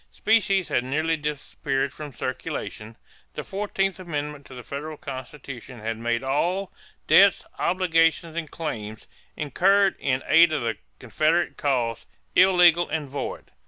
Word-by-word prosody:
Specie 200 Hz, -3 st, +2 dB
had 125 Hz, -, 0 dB
nearly 155 Hz, +5 st, 0 dB
disappeared 145 Hz, -2 st, -3 dB
from 150 Hz, 0 st, -8 dB
circulation. 125 Hz, -4 st, -5 dB, 0.4 s
The -, -, -4 dB
fourteenth 195 Hz, -1 st, -2 dB
amendment 150 Hz, -5 st, -5 dB
to 130 Hz, -, -11 dB
the 125 Hz, -, -9 dB
federal 150 Hz, +4 st, -6 dB
Constitution 130 Hz, -2 st, -8 dB
had 110 Hz, +1 st, -3 dB
made 120 Hz, +1 st, -1 dB
all 175 Hz, +8 st, -1 dB, 0.3 s
"debts, 200 Hz, 0 st, +5 dB
obligations, 165 Hz, -2 st, +2 dB
and 165 Hz, -3 st, -4 dB
claims" 110 Hz, -11 st, -6 dB, 0.3 s
incurred 195 Hz, +7 st, +3 dB
in 130 Hz, -1 st, 0 dB
aid 165 Hz, 0 st, +6 dB
of 150 Hz, -, -1 dB
the 115 Hz, -3 st, -2 dB, 0.2 s
Confederate 155 Hz, -, 0 dB
cause 120 Hz, -5 st, -1 dB, 0.3 s
"illegal 175 Hz, -2 st, +5 dB
and 155 Hz, -2 st, -2 dB
void." 140 Hz, +1 st, -6 dB
150 Hz, 130 wpm, -25 LUFS, 130-175 Hz, 0.4 s, aid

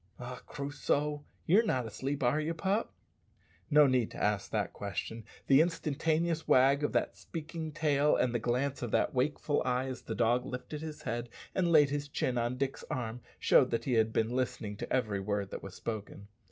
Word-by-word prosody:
"Ah, 125 Hz, 0 st, -7 dB
Crusoe! 145 Hz, +1 st, -2 dB, 0.2 s
you're 195 Hz, +7 st, +6 dB
not 130 Hz, -, 0 dB
asleep, 135 Hz, +6 st, -3 dB
are 125 Hz, +5 st, +3 dB
you, 165 Hz, +2 st, -2 dB
pup?" 195 Hz, +6 st, 0 dB, 0.8 s
No 150 Hz, -1 st, +7 dB
need 130 Hz, -4 st, +2 dB
to -, -, -10 dB
ask 105 Hz, -1 st, 0 dB
that -, -, -1 dB
question. 115 Hz, 0 st, -5 dB, 0.2 s
The 135 Hz, +2 st, +6 dB
instantaneous 165 Hz, 0 st, 0 dB
wag 135 Hz, +3 st, +5 dB
of 145 Hz, -, +1 dB
that -, -, 0 dB
speaking 160 Hz, -1 st, -6 dB
tail 150 Hz, -1 st, +2 dB
and 125 Hz, -, +1 dB
the 120 Hz, -, +1 dB
glance 130 Hz, +4 st, -1 dB
of 120 Hz, -, -2 dB
that -, -, +1 dB
wakeful 145 Hz, +3 st, 0 dB
eye, 125 Hz, +1 st, 0 dB
as 130 Hz, -2 st, -5 dB
the -, -, -5 dB
dog 120 Hz, +1 st, +2 dB
lifted 135 Hz, +4 st, -6 dB
his 155 Hz, -1 st, -7 dB
head 120 Hz, +1 st, -3 dB, 0.2 s
and 175 Hz, -2 st, +1 dB
laid 145 Hz, -3 st, +6 dB
his 145 Hz, 0 st, -2 dB
chin 125 Hz, -3 st, -1 dB
on 120 Hz, +2 st, -1 dB
Dick's 135 Hz, 0 st, -2 dB
arm, 120 Hz, -1 st, -3 dB, 0.2 s
showed 130 Hz, -, +5 dB
that 115 Hz, -, -1 dB
he 130 Hz, -, 0 dB
had 110 Hz, -1 st, +3 dB
been 110 Hz, +1 st, 0 dB
listening 120 Hz, -4 st, -2 dB
to -, -, -6 dB
every 110 Hz, -6 st, +1 dB
word 100 Hz, 0 st, -2 dB
that -, -, -5 dB
was 95 Hz, -1 st, -9 dB
spoken. 105 Hz, -2 st, -6 dB
130 Hz, 195 wpm, -31 LUFS, 120-150 Hz, 0.8 s, No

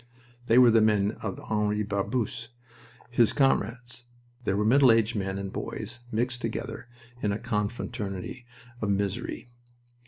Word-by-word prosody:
They 115 Hz, -, +5 dB
were 125 Hz, -2 st, +8 dB
the 115 Hz, 0 st, +5 dB
men 105 Hz, -2 st, +3 dB
of 100 Hz, -4 st, -4 dB
Henri 105 Hz, -1 st, 0 dB
Barbusse 115 Hz, +3 st, -2 dB, 0.6 s
his 120 Hz, -2 st, +4 dB
comrades. 120 Hz, -3 st, 0 dB, 0.4 s
There 95 Hz, -, +1 dB
were 105 Hz, -, +1 dB
middle 130 Hz, +2 st, +6 dB
aged 115 Hz, +1 st, +2 dB
men 95 Hz, -1 st, -2 dB
and 100 Hz, 0 st, -5 dB
boys -, -, -5 dB
mixed 125 Hz, +3 st, -1 dB
together 115 Hz, +2 st, -4 dB, 0.3 s
in 105 Hz, -, +1 dB
a 100 Hz, -, -1 dB
confraternity 110 Hz, 0 st, -4 dB, 0.3 s
of 105 Hz, -, -1 dB
misery. 100 Hz, +5 st, -2 dB
110 Hz, 135 wpm, -28 LUFS, 100-120 Hz, 0.6 s, were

